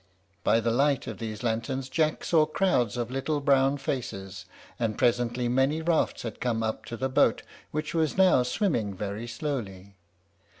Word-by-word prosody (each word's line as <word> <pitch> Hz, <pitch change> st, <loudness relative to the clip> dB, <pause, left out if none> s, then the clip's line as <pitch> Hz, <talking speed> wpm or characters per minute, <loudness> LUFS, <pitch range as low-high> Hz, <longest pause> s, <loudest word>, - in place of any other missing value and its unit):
By 115 Hz, -, +4 dB
the 115 Hz, 0 st, 0 dB
light 140 Hz, +2 st, +2 dB
of -, -, -6 dB
these 110 Hz, 0 st, -5 dB
lanterns 120 Hz, +3 st, -2 dB
Jack 155 Hz, +3 st, 0 dB
saw 155 Hz, -2 st, +3 dB
crowds 130 Hz, -, +1 dB
of 120 Hz, 0 st, -3 dB
little 135 Hz, +3 st, -1 dB
brown 140 Hz, 0 st, +3 dB
faces; 95 Hz, -9 st, -5 dB, 0.3 s
and 110 Hz, -3 st, -1 dB
presently 120 Hz, 0 st, +1 dB
many 135 Hz, +5 st, +2 dB
rafts 165 Hz, -1 st, +1 dB
had 115 Hz, -, -6 dB
come 115 Hz, -2 st, 0 dB
up 110 Hz, 0 st, -3 dB
to 115 Hz, -, -6 dB
the 130 Hz, -, -1 dB
boat, 130 Hz, -, +2 dB, 0.3 s
which 155 Hz, 0 st, -3 dB
was 160 Hz, -1 st, 0 dB
now 185 Hz, -8 st, +5 dB
swimming 125 Hz, -, 0 dB
very 105 Hz, +4 st, -4 dB
slowly. 105 Hz, -8 st, -5 dB
125 Hz, 165 wpm, -27 LUFS, 115-145 Hz, 0.3 s, now